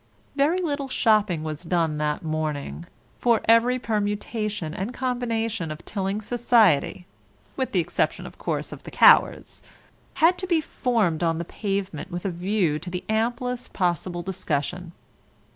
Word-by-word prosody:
Very 295 +5 +3
little 285 -6 -2
shopping 210 -10 +2
was 155 -2 -5
done 165 -3 0
that 150 +1 -1
morning, 155 +1 -3 0.3
for 235 -2 +3
every 230 +3 +4
permutation 210 -5 -2
and 205 +8 -4
combination 230 -7 -2
of 155 +1 -8
Tilling 195 +1 -2
society 215 - +2 0.5
(with 260 -1 -2
the 185 - +2
exception, - - -1
of - - -11
course, - - -2
of - - -10
the - - -9
cowards) - - +4 0.5
had 350 +3 +4
to 370 - -2
be 340 -3 +3
formed 225 - 0
on 165 -1 +1
the 170 - -4
pavement 195 -4 -3
with 175 +1 -5
a 195 - 0
view 175 -3 0
to 175 - -5
the 180 0 -4
amplest 240 +3 -1
possible 175 -1 -1
discussion. 175 -1 -3
200 Hz, 145 wpm, -25 LUFS, 170-235 Hz, 0.5 s, every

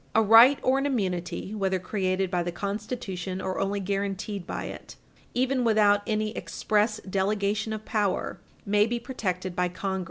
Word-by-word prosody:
A 225 - +6
right 230 +6 +8
or 260 +1 +3
an 275 - 0
immunity, 190 -6 -2
whether 190 -3 0
created 185 0 -1
by 180 -2 +1
the 175 0 -2
Constitution 195 -1 -4
or 190 0 -3
only 195 +1 0
guaranteed 195 0 -3
by - - -4
it, - - -8 0.4
even 255 0 +1
without 210 -3 +4
any 215 0 -1
express 210 +1 0
delegation 200 +3 0
of 215 0 -5
power, 205 -4 -1 0.3
may 210 +1 +3
be 240 +1 -2
protected 185 -7 -3
by 180 0 +1
Congress. 190 +1 -3
205 Hz, 160 wpm, -27 LUFS, 190-220 Hz, 0.4 s, right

